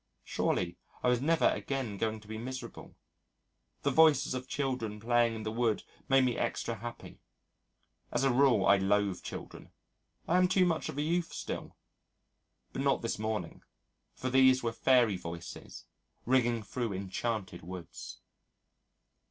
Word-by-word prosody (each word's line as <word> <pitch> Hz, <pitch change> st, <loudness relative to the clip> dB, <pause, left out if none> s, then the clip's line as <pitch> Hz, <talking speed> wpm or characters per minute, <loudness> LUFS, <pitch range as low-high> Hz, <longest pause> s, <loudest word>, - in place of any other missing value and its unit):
Surely 90 Hz, -1 st, -1 dB, 0.2 s
I -, -, +4 dB
was 125 Hz, 0 st, +2 dB
never 165 Hz, +3 st, +2 dB
again 130 Hz, -7 st, -3 dB
going 110 Hz, -1 st, -1 dB
to 105 Hz, -, -17 dB
be 110 Hz, 0 st, -6 dB
miserable. 130 Hz, +2 st, -7 dB, 0.9 s
The 140 Hz, -, +2 dB
voices 150 Hz, -3 st, +5 dB
of 130 Hz, 0 st, -4 dB
children 130 Hz, -7 st, -2 dB
playing 120 Hz, +1 st, +2 dB
in 110 Hz, -, -6 dB
the 110 Hz, -, -2 dB
wood 115 Hz, -1 st, 0 dB, 0.3 s
made 135 Hz, -1 st, +5 dB
me 125 Hz, -2 st, +1 dB
extra 115 Hz, 0 st, -1 dB
happy. 120 Hz, +3 st, -8 dB, 0.9 s
As -, -, 0 dB
a 135 Hz, -2 st, +3 dB
rule 125 Hz, -6 st, +4 dB
I 100 Hz, +1 st, +6 dB
loathe 100 Hz, 0 st, +1 dB
children. -, -, -8 dB, 0.6 s
I 175 Hz, -, +3 dB
am 180 Hz, -, +5 dB
too 185 Hz, 0 st, +3 dB
much 165 Hz, -3 st, 0 dB
of -, -, -6 dB
a 145 Hz, -, 0 dB
youth 170 Hz, +2 st, 0 dB
still. -, -, -6 dB, 1.0 s
But -, -, -2 dB
not -, -, +1 dB
this -, -, -2 dB
morning. 110 Hz, 0 st, -3 dB, 0.5 s
For 130 Hz, -, -3 dB
these 130 Hz, -1 st, +5 dB
were 115 Hz, -1 st, -1 dB
fairy 120 Hz, -6 st, +3 dB
voices 85 Hz, -1 st, -8 dB, 0.4 s
ringing 120 Hz, -3 st, +2 dB
through 115 Hz, +1 st, -3 dB
enchanted 95 Hz, 0 st, -3 dB
woods. 90 Hz, 0 st, -9 dB
120 Hz, 150 wpm, -31 LUFS, 105-130 Hz, 1.0 s, I